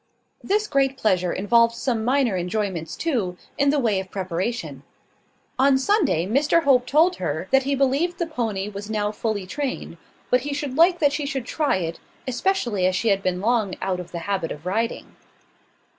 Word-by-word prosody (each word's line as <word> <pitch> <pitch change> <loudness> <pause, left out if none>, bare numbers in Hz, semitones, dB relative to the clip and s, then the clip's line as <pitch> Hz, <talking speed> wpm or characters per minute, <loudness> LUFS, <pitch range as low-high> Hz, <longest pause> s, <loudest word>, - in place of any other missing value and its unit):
This 420 +2 +1
great 275 -6 +1
pleasure 185 -7 +1
involved 230 +4 +3
some 235 -2 -1
minor 250 -3 +2
enjoyments 180 -2 -2
too, 220 - -1 0.2
in 280 0 +2
the 295 - +2
way 225 -8 +1
of 190 0 -7
preparation. 190 +5 -3 0.8
On 270 0 +5
Sunday 275 - +2
Mr 285 - +2
Hope 255 -3 +3
told 325 +7 +3
her, 160 0 -3
that 270 - +5
he 280 - +2
believed 275 +6 +1
the 340 - -1
pony 225 -11 -3
was 205 0 -7
now 210 -1 -1
fully 215 -3 -3
trained; 275 +8 -4 0.3
but 250 - +4
he 285 +2 -3
should 285 -3 -4
like 340 +3 +5
that 290 -4 +2
she 290 -1 -2
should 270 -4 -3
try 295 -3 0
it, 165 -3 -3 0.3
especially 240 - 0
as 185 - 0
she 225 - +1
had 195 -1 +2
been 185 -1 -1
long 220 -3 +1
out 185 -1 -2
of 175 -1 -8
the 175 - -5
habit 195 -5 -2
of 150 +3 -8
riding. 225 +6 -2
230 Hz, 185 wpm, -23 LUFS, 190-280 Hz, 0.8 s, On